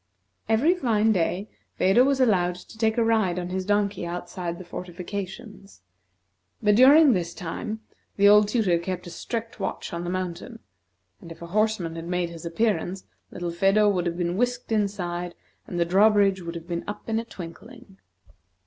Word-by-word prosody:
Every 250 Hz, +11 st, +4 dB
fine 225 Hz, -, +2 dB
day, 185 Hz, +1 st, 0 dB, 0.3 s
Phedo 195 Hz, +7 st, +5 dB
was 275 Hz, 0 st, +2 dB
allowed 180 Hz, -8 st, +2 dB
to 180 Hz, -, -13 dB
take 220 Hz, 0 st, 0 dB
a 235 Hz, -, +3 dB
ride 220 Hz, -6 st, +2 dB
on 180 Hz, 0 st, -3 dB
his 185 Hz, 0 st, -3 dB
donkey 205 Hz, -2 st, +1 dB
outside 175 Hz, +1 st, -5 dB
of -, -, -10 dB
the 185 Hz, -, -9 dB
fortifications, 190 Hz, -, -8 dB, 0.8 s
but 210 Hz, -2 st, +3 dB
during 275 Hz, +4 st, +7 dB
this 170 Hz, -3 st, -2 dB
time, 215 Hz, +5 st, -5 dB, 0.4 s
the 200 Hz, 0 st, +5 dB
old 210 Hz, 0 st, +7 dB
tutor 205 Hz, -6 st, +2 dB
kept 185 Hz, +1 st, -4 dB
a 175 Hz, -, -8 dB
strict 230 Hz, +4 st, -5 dB
watch 195 Hz, -, -4 dB
on 170 Hz, 0 st, -3 dB
the 175 Hz, -, -4 dB
mountain; 185 Hz, +5 st, -4 dB, 0.6 s
and 170 Hz, -, -11 dB
if 165 Hz, -, -10 dB
a 170 Hz, +1 st, -10 dB
horseman 215 Hz, -6 st, 0 dB
had 165 Hz, 0 st, -6 dB
made 175 Hz, -1 st, -1 dB
his 170 Hz, 0 st, -7 dB
appearance, 190 Hz, 0 st, -1 dB, 0.3 s
little 175 Hz, -1 st, -4 dB
Phedo 195 Hz, +4 st, +3 dB
would 180 Hz, -3 st, 0 dB
have 170 Hz, 0 st, -3 dB
been 175 Hz, 0 st, -1 dB
whisked 245 Hz, +1 st, -1 dB
inside, 180 Hz, -5 st, -2 dB, 0.3 s
and 175 Hz, -, -4 dB
the 170 Hz, -, +3 dB
drawbridge 195 Hz, +1 st, +4 dB
would 170 Hz, 0 st, -6 dB
have 170 Hz, 0 st, -8 dB
been 170 Hz, -1 st, -3 dB
up 205 Hz, -, -7 dB
in 225 Hz, 0 st, 0 dB
a -, -, -3 dB
twinkling. 215 Hz, +2 st, -11 dB
195 Hz, 180 wpm, -25 LUFS, 175-220 Hz, 0.8 s, during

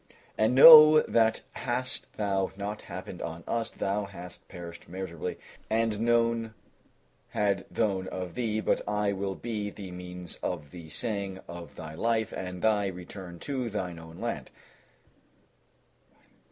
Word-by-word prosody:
And 110 Hz, +3 st, +2 dB
know 155 Hz, +2 st, +11 dB
that 110 Hz, -1 st, +2 dB
hadst 125 Hz, +1 st, -3 dB
thou 100 Hz, -3 st, 0 dB
not 100 Hz, +1 st, -4 dB
happened 90 Hz, 0 st, -8 dB
on 85 Hz, 0 st, -5 dB
us, 115 Hz, -1 st, -1 dB
thou 100 Hz, +1 st, -2 dB
hadst 90 Hz, -2 st, -10 dB
perished 85 Hz, -2 st, -10 dB
miserably 90 Hz, -2 st, -5 dB, 0.3 s
and 110 Hz, -1 st, +1 dB
none 115 Hz, -1 st, +1 dB, 0.7 s
had 100 Hz, -2 st, 0 dB
known 95 Hz, -4 st, 0 dB
of 90 Hz, -2 st, -5 dB
thee; 110 Hz, -3 st, -1 dB
but -, -, +1 dB
I 105 Hz, -1 st, +1 dB
will 95 Hz, 0 st, -3 dB
be 105 Hz, -2 st, -3 dB
the 100 Hz, -2 st, -9 dB
means 90 Hz, -1 st, -8 dB
of 75 Hz, -5 st, -4 dB
the 85 Hz, -3 st, -10 dB
saving 100 Hz, +1 st, -3 dB
of 85 Hz, -3 st, -9 dB
thy 80 Hz, -1 st, -8 dB
life 110 Hz, +4 st, 0 dB
and 90 Hz, -1 st, -5 dB
of 90 Hz, -, -9 dB
thy 105 Hz, -2 st, +3 dB
return 90 Hz, -1 st, -8 dB
to 130 Hz, -4 st, -2 dB
thine 90 Hz, -5 st, -4 dB
own 80 Hz, 0 st, -12 dB
land." -, -, -3 dB
100 Hz, 140 wpm, -29 LUFS, 90-110 Hz, 0.7 s, know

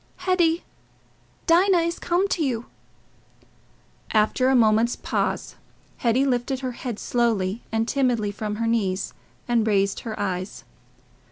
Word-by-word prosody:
"Hetty... 345 Hz, -3 st, +2 dB, 0.8 s
Dinah 360 Hz, +3 st, +5 dB
is 335 Hz, +1 st, -2 dB
come 360 Hz, +3 st, +1 dB
to 335 Hz, -, 0 dB
you." 245 Hz, -4 st, -1 dB, 1.5 s
After 220 Hz, +4 st, +3 dB
a 265 Hz, -, +4 dB
moment's 225 Hz, 0 st, +4 dB
pause, -, -, -2 dB, 0.4 s
Hetty 245 Hz, +3 st, +2 dB
lifted 260 Hz, 0 st, -1 dB
her 255 Hz, -1 st, -2 dB
head 240 Hz, -2 st, -5 dB
slowly 225 Hz, -4 st, 0 dB
and 225 Hz, +1 st, 0 dB
timidly 245 Hz, -7 st, +1 dB
from 210 Hz, +1 st, -4 dB
her 230 Hz, +2 st, -2 dB
knees 200 Hz, -5 st, 0 dB, 0.3 s
and 235 Hz, -2 st, +2 dB
raised 200 Hz, -2 st, +2 dB
her 220 Hz, -2 st, -6 dB
eyes. 185 Hz, -1 st, -3 dB
235 Hz, 125 wpm, -24 LUFS, 215-270 Hz, 1.5 s, Dinah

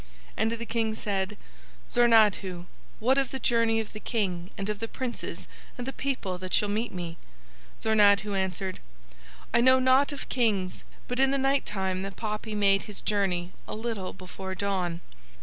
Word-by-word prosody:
And 225 Hz, -, +1 dB
the 230 Hz, 0 st, -3 dB
King 225 Hz, -1 st, 0 dB
said: 200 Hz, -1 st, -2 dB, 0.5 s
"Zornadhu, 210 Hz, -7 st, +4 dB, 0.3 s
what 260 Hz, +5 st, +3 dB
of 270 Hz, -, 0 dB
the 265 Hz, -, -4 dB
journey 230 Hz, -3 st, +2 dB
of 220 Hz, -, -5 dB
the 215 Hz, -, -6 dB
King 185 Hz, -7 st, -2 dB
and 195 Hz, -, -3 dB
of 210 Hz, -1 st, -2 dB
the 225 Hz, -, -3 dB
princes 250 Hz, +1 st, -5 dB, 0.3 s
and 245 Hz, -, -4 dB
the 270 Hz, -, -4 dB
people 230 Hz, -11 st, -2 dB
that 185 Hz, 0 st, -1 dB
shall 210 Hz, -, +2 dB
meet 220 Hz, +4 st, -1 dB
me?" 175 Hz, -2 st, -5 dB, 0.7 s
Zornadhu 205 Hz, -1 st, +4 dB
answered: 190 Hz, 0 st, -2 dB, 0.7 s
"I 235 Hz, -, +5 dB
know 260 Hz, +1 st, +7 dB
nought 260 Hz, +3 st, +4 dB
of 285 Hz, -, -6 dB
Kings, 205 Hz, -7 st, 0 dB, 0.2 s
but 250 Hz, +1 st, -3 dB
in 270 Hz, 0 st, +5 dB
the 275 Hz, -, +2 dB
night 275 Hz, +1 st, +2 dB
time 190 Hz, -2 st, -1 dB
the 195 Hz, +1 st, -4 dB
poppy 215 Hz, +1 st, -4 dB
made 195 Hz, -1 st, +4 dB
his 205 Hz, -, -6 dB
journey 185 Hz, -4 st, 0 dB, 0.2 s
a -, -, -4 dB
little 220 Hz, -4 st, -3 dB
before 190 Hz, +1 st, -7 dB
dawn. 185 Hz, -3 st, -1 dB
210 Hz, 170 wpm, -28 LUFS, 190-235 Hz, 0.7 s, know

